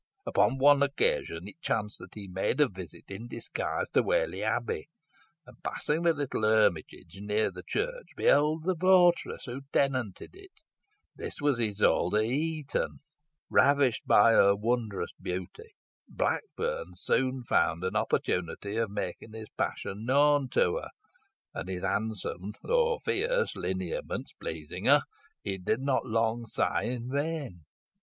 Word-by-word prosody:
"Upon 105 +6 +2
one 145 +1 +6
occasion 100 -10 0
it 155 +10 -13
chanced 105 -8 -2
that - - -12
he 105 -2 -8
made 95 +9 -1
a 150 - +6
visit 95 - -10
in 100 +5 -7
disguise - - -3
to - - +4
Whalley - - 0
Abbey, 450 -1 -2 0.6
and, - - -17
passing 155 +2 -1
the 170 -1 +4
little 145 -6 -3
hermitage 100 -5 +1
near 105 0 0
the 90 0 -9
church, - - -3
beheld 150 +2 +3
the 185 +2 +1
votaress 180 0 +3
who 125 +2 -6
tenanted 130 -8 0
it. 390 0 -15 0.6
This - - -6
was 145 -4 +1
Isole 105 -5 +2
de 105 - +1
Heton. 150 +4 -2 0.5
Ravished 140 -5 +4
by 115 - +6
her 100 -2 +6
wondrous 110 -1 -1
beauty, 95 - -6 0.3
Blackburn 485 +2 -2
soon 130 -1 0
found 85 -6 +1
an 95 - -2
opportunity 95 +4 -1
of 115 -2 0
making 100 +2 -5
his 110 -1 -8
passion 100 +3 -3
known 140 +1 +4
to 90 - +2
her, - - -6 0.6
and 90 - -5
his 90 -1 -4
handsome 105 -2 -2
though 475 -1 +2
fierce 475 +4 0
lineaments - - -4
pleasing - - -7
her, - - +6 0.4
he 95 -1 -3
did 110 +7 -1
not 135 -1 0
long 115 +1 0
sigh - - 0
in 120 0 -3
vain. 140 - -3
125 Hz, 140 wpm, -29 LUFS, 105-155 Hz, 0.6 s, one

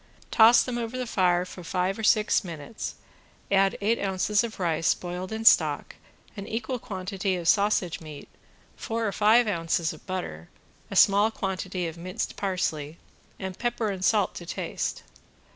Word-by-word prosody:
Toss 225 +2 +7
them 245 -1 -3
over 235 +2 -4
the 255 - -2
fire 180 -5 +2
for 180 0 -10
five 185 +4 -1
or - - -5
six 215 -1 +3
minutes, 170 +4 -7 0.6
add 195 0 +3
eight 225 +3 +1
ounces 200 +2 +1
of 225 -3 -6
rice 165 -2 +1
boiled 180 +2 -6
in 220 0 -4
stock, 155 -8 +4 0.4
an 200 -1 -7
equal 240 +3 -3
quantity 195 -3 -3
of 175 -2 -4
sausage 200 -4 +2
meat, 150 -3 -10 0.5
four 225 -1 -2
or - - -1
five 220 +4 +4
ounces 165 -3 0
of 155 - -16
butter, 85 - -5 0.4
a - - -6
small 205 +2 +5
quantity 185 -3 -3
of 165 0 -6
minced 185 +2 -4
parsley, 165 -5 -2 0.4
and 190 -1 -6
pepper 240 -2 -1
and 190 -1 -5
salt 205 -1 +2
to 175 - -8
taste. - - -4
190 Hz, 160 wpm, -26 LUFS, 175-220 Hz, 0.6 s, Toss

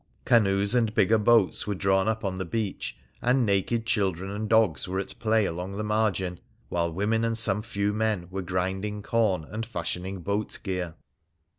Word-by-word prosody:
Canoes 100 -2 +4
and 115 -3 +2
bigger 110 +3 +4
boats 105 -3 +3
were 105 - -1
drawn 95 +1 +2
up 110 -1 -1
on 95 -1 -2
the - - -1
beach, 105 +3 -3 0.2
and 125 0 +3
naked 105 +3 +1
children 95 -4 0
and 105 +1 -4
dogs 110 - +3
were 95 +1 -2
at 100 - -4
play 110 -2 +2
along 90 +3 -4
the 105 - -2
margin; 105 -4 0 0.3
while 85 -1 0
women 105 +6 0
and 115 0 0
some 105 -2 +2
few 105 -2 -1
men 105 -4 0
were 95 +1 -3
grinding 95 +3 -2
corn 105 -8 +1
and 110 +8 -5
fashioning 95 -3 -4
boat 100 +4 -2
gear. 90 -4 -3
100 Hz, 175 wpm, -27 LUFS, 95-110 Hz, 0.3 s, Canoes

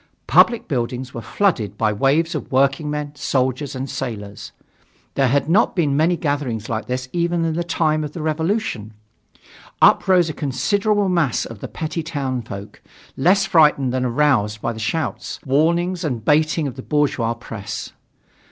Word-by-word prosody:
Public 235 - +4
buildings 125 0 -3
were 115 - -5
flooded 110 - 0
by 110 -1 +1
waves 145 - +2
of 155 - -5
working 135 +3 +2
men, 150 -1 -4
soldiers 130 -1 -1
and 130 +1 -4
sailors. 105 -6 -6 0.6
There 135 -1 +2
had 140 +3 +1
not 180 +7 +3
been 150 -6 +1
many 165 +4 +2
gatherings 140 -8 -2
like 110 0 -3
that 130 +1 -3
even 170 -1 0
in 165 - 0
the 170 +2 -1
time 155 -2 0
of 150 -1 -6
the 165 - -5
Revolution. 155 - -2 0.8
Up - - +5
rose 180 -3 +4
a 160 - -3
considerable 200 - 0
mass 170 -9 +1
of 115 -3 -9
the - - -6
petty 165 0 -4
townfolk, 130 -10 -5 0.3
less 190 +8 +3
frightened 150 -6 +4
than 130 0 0
aroused 120 -5 +1
by 115 - -2
the 110 - -9
shouts, 115 0 -3
warnings 170 +6 +1
and 125 -8 -3
baiting 155 0 +2
of 130 - -6
the - - -5
bourgeois 135 -6 0
press. 115 -4 -7
145 Hz, 160 wpm, -21 LUFS, 125-165 Hz, 0.8 s, Up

